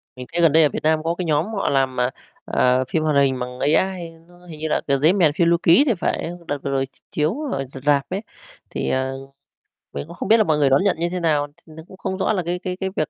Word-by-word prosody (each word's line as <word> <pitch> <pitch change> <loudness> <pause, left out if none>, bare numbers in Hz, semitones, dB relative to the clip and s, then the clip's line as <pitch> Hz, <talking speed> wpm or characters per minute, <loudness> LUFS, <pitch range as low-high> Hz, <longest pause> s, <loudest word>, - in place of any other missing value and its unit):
Mình 125 0 -8
thấy 170 - +1
gần 165 -3 +5
đây 160 +1 +5
ở 150 - +4
Việt - - -5
Nam 155 0 +2
có 165 +1 -1
cái 180 - -3
nhóm 155 +1 +1
họ 195 - -1
làm, 135 -2 +1
à, 125 +1 +1 0.3
ờ, 125 +1 +2
phim 160 -1 0
hoạt 155 -2 +1
hình 135 -2 +3
bằng 125 0 -6
AI, 170 +2 0 0.2
nó 175 0 -19
hình 160 -3 -10
như 160 - -2
là, - - +1
kiểu, 140 0 +2
"Dế 155 +6 +4
Mèn 165 -7 +3
Phiêu 170 +1 +2
Lưu 170 0 +4
Ký" 175 +12 +6
thì 245 - +2
phải, 170 -2 -2 0.2
đợt 145 - -2
vừa 140 - -2
rồi 135 0 0
ch 135 - -26
chiếu 155 - 0
ở 135 0 -2
r 135 - -11
rạp 140 -2 +3
ấy, 190 +3 -3 0.5
thì, - - -3
à, 130 0 0 0.8
mình 145 - -5
cũng 170 - -11
không - - -5
biết 225 - +7
là 215 - +4
mọi 155 -5 +1
người 140 -2 +3
đón 135 +8 +3
nhận 200 -5 +2
như 170 +1 0
thế 180 0 -3
nào, 150 -3 +1
t - - -26
nó 160 0 -12
cũng 190 - -14
không 190 -1 -4
rõ 195 - +1
là 185 -3 -1
cái 175 +1 -2
cái 180 -1 -5
cái 190 -1 -2
việc 155 - -1
160 Hz, 295 wpm, -21 LUFS, 140-180 Hz, 0.8 s, biết